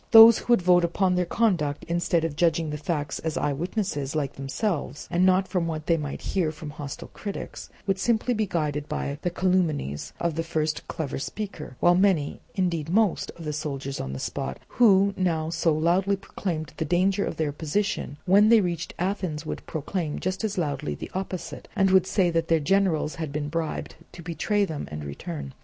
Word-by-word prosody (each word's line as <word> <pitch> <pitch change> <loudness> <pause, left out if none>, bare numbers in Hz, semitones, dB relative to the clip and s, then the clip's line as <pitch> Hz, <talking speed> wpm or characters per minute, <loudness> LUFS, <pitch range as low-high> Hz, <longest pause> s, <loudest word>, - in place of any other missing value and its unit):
Those 225 0 +10
who 240 - +2
would 190 - +3
vote 175 0 +5
upon 180 +2 +2
their 180 -1 +1
conduct, 170 -10 +1
instead 170 -1 +1
of 160 -3 -3
judging 165 -1 +2
the 150 - -3
facts 150 -3 -2
as 160 -1 -3
eye 145 - +1
witnesses 160 -3 -2
like 145 -3 -1
themselves 145 +2 -3
and 175 +1 +2
not 185 +1 +3
from 180 -3 0
what 155 -2 -4
they 170 - +3
might 150 -3 -4
hear 175 -5 +2
from 155 -1 -8
hostile 145 -1 -7
critics, 200 -2 -7 0.2
would 195 -1 0
simply 235 +3 +1
be 215 -2 0
guided 150 -4 -2
by 140 +1 -3
the 175 - 0
calumnies 170 - 0
of 170 -1 0
the 165 - -1
first 155 -1 -2
clever 155 -5 -3
speaker; 155 - -6
while 175 - +5
many, 180 -6 +2
indeed 170 -5 0
most, 210 0 +2
of 165 - -8
the 150 - -2
soldiers 140 -3 -4
on 65 - -4
the 65 - -4
spot, 65 0 -3
who 200 -4 +5
now 165 -4 0
so 165 0 +2
loudly 175 +6 +2
proclaimed 170 -5 -4
the - - 0
danger 185 +5 +2
of - - -3
their 155 -2 0
position, 160 +1 -2
when 200 +3 +6
they 230 -1 +7
reached 170 -4 -2
Athens 180 -4 -2
would - - -5
proclaim 160 0 -3
just 185 +3 -2
as 210 -3 -2
loudly 145 -4 -1
the - - -8
opposite, 185 -1 -5
and 195 -1 +3
would 190 -1 +5
say 180 -4 +2
that 165 -1 0
their 165 -1 +3
generals 170 -2 +2
had 155 -3 -3
been 145 0 -3
bribed 165 0 -3 0.2
to 170 - -10
betray 190 +5 0
them 160 -6 -5
and 75 0 -6
return. 145 - -6
170 Hz, 195 wpm, -26 LUFS, 150-190 Hz, 0.2 s, Those